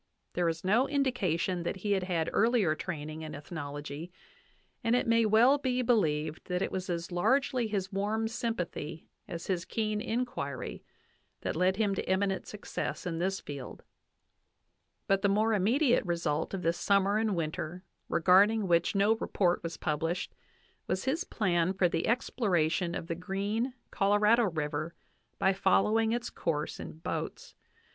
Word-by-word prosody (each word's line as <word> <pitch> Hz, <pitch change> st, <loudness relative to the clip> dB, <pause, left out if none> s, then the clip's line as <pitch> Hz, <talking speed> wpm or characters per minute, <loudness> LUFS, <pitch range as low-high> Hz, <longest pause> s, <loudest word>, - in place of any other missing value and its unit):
There 175 Hz, -1 st, +1 dB
is 165 Hz, 0 st, -4 dB
no 220 Hz, +8 st, +3 dB
indication 195 Hz, -, 0 dB
that 170 Hz, -, -2 dB
he 205 Hz, +2 st, -3 dB
had 195 Hz, -1 st, +3 dB
had 170 Hz, -3 st, 0 dB
earlier 225 Hz, -7 st, +3 dB
training 155 Hz, -2 st, -5 dB
in 155 Hz, -1 st, -6 dB
ethnology, 145 Hz, +1 st, -6 dB, 0.7 s
and 230 Hz, +1 st, +3 dB
it 250 Hz, -, +2 dB
may 230 Hz, -1 st, +4 dB
well 240 Hz, +7 st, +5 dB
be 255 Hz, -2 st, 0 dB
believed 160 Hz, -10 st, +1 dB
that 180 Hz, +1 st, -1 dB
it -, -, -2 dB
was 185 Hz, -1 st, -4 dB
as 170 Hz, 0 st, -3 dB
largely 250 Hz, +6 st, +2 dB
his 195 Hz, -3 st, -2 dB
warm 215 Hz, +3 st, 0 dB
sympathy 180 Hz, -9 st, -4 dB, 0.2 s
as 170 Hz, -1 st, -6 dB
his 180 Hz, -3 st, -1 dB
keen 215 Hz, 0 st, -2 dB
inquiry 140 Hz, -, -3 dB, 0.6 s
that -, -, -2 dB
led 185 Hz, +3 st, +2 dB
him 210 Hz, -3 st, +2 dB
to 195 Hz, -, -3 dB
eminent 190 Hz, 0 st, 0 dB
success 210 Hz, -2 st, -5 dB
in 165 Hz, -2 st, -2 dB
this 190 Hz, +2 st, 0 dB
field; 140 Hz, -3 st, -8 dB, 1.2 s
but 195 Hz, 0 st, +2 dB
the 200 Hz, -, +3 dB
more 215 Hz, +3 st, +3 dB
immediate 235 Hz, +7 st, +3 dB
result 170 Hz, -2 st, -1 dB
of 185 Hz, -, -5 dB
this 165 Hz, +1 st, +1 dB
summer 200 Hz, +1 st, +3 dB
and 220 Hz, -3 st, +1 dB
winter, 170 Hz, +2 st, -3 dB, 0.3 s
regarding 195 Hz, +5 st, +4 dB
which 170 Hz, +2 st, +2 dB
no 205 Hz, +3 st, +4 dB
report 180 Hz, -5 st, +1 dB
was 165 Hz, -1 st, -5 dB
published, 165 Hz, +4 st, -2 dB, 0.5 s
was 185 Hz, +4 st, -1 dB
his 305 Hz, +7 st, 0 dB
plan 180 Hz, -, +1 dB
for 190 Hz, -1 st, +3 dB
the 165 Hz, -1 st, -1 dB
exploration 180 Hz, -8 st, +1 dB
of -, -, -4 dB
the 165 Hz, -, -3 dB
Green 200 Hz, +8 st, -2 dB, 0.2 s
Colorado 210 Hz, +4 st, +4 dB
River 155 Hz, -2 st, -2 dB, 0.4 s
by 190 Hz, -, +3 dB
following 210 Hz, +4 st, +3 dB
its 240 Hz, +1 st, -2 dB
course 150 Hz, -2 st, -2 dB
in -, -, -7 dB
boats. 460 Hz, -, -5 dB
190 Hz, 155 wpm, -30 LUFS, 170-220 Hz, 1.2 s, well